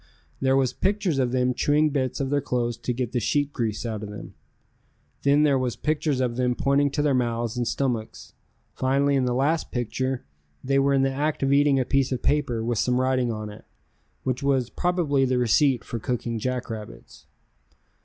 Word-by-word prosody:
There 135 0 +3
was 130 -2 +1
pictures 195 -7 0
of 125 -2 +1
them 125 0 +1
chewing 150 +4 +2
bits 130 -3 -1
of 135 -1 -2
their 145 0 +2
clothes 120 -3 -1
to 120 +2 -4
get 125 -1 -2
the 125 - 0
sheep 145 +5 0
grease 110 -2 -2
out 110 -3 -3
of 105 - -6
them. 105 - -9 0.9
Then 145 +2 +4
there 140 -3 +3
was 125 -2 -1
pictures 150 -3 -1
of 120 -2 -1
them 125 -1 +1
pointing 140 +2 +2
to 145 - 0
their 145 -2 +2
mouths 120 -2 -1
and 120 -1 -1
stomachs, 115 -3 -3 0.4
finally 140 +2 +1
in 130 -2 +2
the 125 -1 0
last 150 +5 +1
picture 130 +1 -2 0.4
they 135 +1 +2
were 140 0 +3
in 135 - +3
the 135 0 +1
act 145 +1 -1
of 135 0 +2
eating 140 -1 +4
a 130 - 0
piece 135 0 +1
of 125 -2 -2
paper 140 -6 +1
with 115 -1 -1
some 125 0 +1
writing 130 -2 +1
on 110 -1 -5
it, 105 - -13 0.6
which 130 -1 -2
was 135 -3 +1
probably 170 -6 +1
the 130 -1 +1
receipt 125 +2 +3
for 115 - -5
cooking 115 0 -3
jackrabbits. 115 -3 -6
130 Hz, 195 wpm, -25 LUFS, 120-140 Hz, 0.9 s, Then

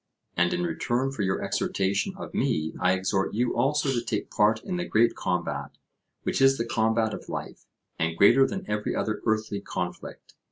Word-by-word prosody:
And, 85 0 +2
in 90 - -1
return 120 +10 -1
for 135 - -4
your 95 -1 0
exhortation 100 +1 -1
of - - -8
me, 80 0 0
I 90 0 +3
exhort 95 +1 0
you 120 +2 +1
also 140 +4 +1
to 120 -2 -1
take 105 - -3
part 105 +1 +3
in 180 -2 -3
the 175 - -1
great 115 -4 +3
combat, 75 -6 -3 0.5
which - - -1
is 135 0 +6
the 115 - -1
combat 110 -1 +1
of - - -8
life, - - -6 0.3
and 80 +1 -1
greater 135 +8 +6
than 195 -2 -5
every 105 0 -2
other 110 -1 -2
earthly 110 -2 0
conflict. 90 -2 -6
110 Hz, 185 wpm, -27 LUFS, 95-120 Hz, 0.5 s, is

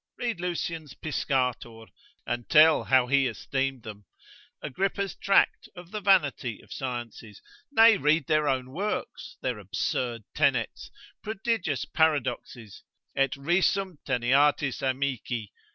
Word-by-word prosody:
Read 235 -7 -3
Lucian's 165 -4 -4
Piscator, 125 -6 -2 0.4
and 120 -1 -4
tell 155 +1 +6
how 130 -2 +4
he 135 +1 +2
esteemed 135 +2 -3
them; 105 -2 -10 0.5
Agrippa's 195 +6 -2
Tract 195 0 +2
of 175 0 -12
the 215 -1 -4
vanity 145 - +2
of - - -12
Sciences; 120 -5 -6 0.3
nay 225 -5 +6
read 150 +1 +2
their 155 0 +1
own 130 -2 -1
works, 200 +8 -4
their 125 -4 -2
absurd 115 +4 -3
tenets, - - 0 0.3
prodigious 200 - -2
paradoxes, 130 - -1 0.3
et 135 -1 +1
risum 175 +3 0
teneatis 135 +2 +2
amici? 130 -4 -2
140 Hz, 115 wpm, -27 LUFS, 125-170 Hz, 0.5 s, tell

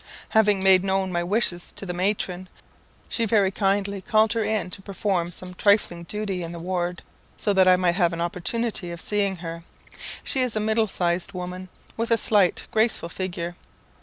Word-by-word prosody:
Having 210 -3 +3
made 190 -1 +6
known 190 -1 0
my 175 -1 -1
wishes 180 -2 +1
to - - -6
the 180 - -4
matron, 185 -1 -2 0.6
she 230 - 0
very 200 -3 +3
kindly 200 0 0
called 215 +2 +3
her 230 - 0
in 215 -4 -1
to 195 - -8
perform 190 -3 -2
some 180 +1 -10
trifling 180 -3 +2
duty 200 -2 -3
in 170 0 -5
the - - -7
ward, 175 0 -3 0.3
so 205 - 0
that 190 -1 +4
I 185 - +7
might 180 -1 +1
have 175 -4 +3
an 170 - -5
opportunity 180 +3 0
of 170 0 -6
seeing 200 0 0
her. 165 -1 -7 0.6
She 265 - +1
is 250 -3 0
a - - +1
middle 220 +1 +1
sized 180 0 -1
woman, 180 0 -6 0.3
with 230 +1 -1
a 230 - +4
slight 205 -5 +3
graceful 220 -6 +1
figure. 175 -2 -4
190 Hz, 185 wpm, -24 LUFS, 175-210 Hz, 0.6 s, I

